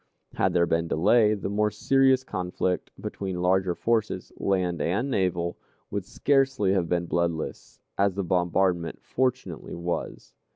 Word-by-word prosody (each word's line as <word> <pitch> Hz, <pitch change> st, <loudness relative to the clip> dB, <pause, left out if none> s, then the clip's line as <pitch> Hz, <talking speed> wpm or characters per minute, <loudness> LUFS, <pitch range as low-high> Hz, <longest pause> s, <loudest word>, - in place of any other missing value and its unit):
Had -, -, +1 dB
there 85 Hz, -1 st, +4 dB
been 85 Hz, 0 st, 0 dB
delay, 105 Hz, +6 st, +4 dB
the 100 Hz, -, -4 dB
more 105 Hz, +2 st, +1 dB
serious 130 Hz, +3 st, +3 dB
conflict 90 Hz, -4 st, -2 dB
between 95 Hz, -3 st, -4 dB
larger 95 Hz, -1 st, +2 dB
forces, 115 Hz, +1 st, -1 dB
land 90 Hz, -3 st, 0 dB
and 115 Hz, +11 st, 0 dB
naval, 90 Hz, -5 st, 0 dB, 0.3 s
would 100 Hz, -2 st, -3 dB
scarcely 135 Hz, -8 st, +2 dB
have 90 Hz, -4 st, 0 dB
been 85 Hz, -1 st, 0 dB
bloodless, 85 Hz, -2 st, -3 dB, 0.2 s
as 100 Hz, -1 st, +2 dB
the 100 Hz, -, -1 dB
bombardment 90 Hz, -1 st, +1 dB
fortunately 125 Hz, -10 st, -2 dB
was. 85 Hz, 0 st, -4 dB
95 Hz, 135 wpm, -26 LUFS, 85-105 Hz, 0.3 s, there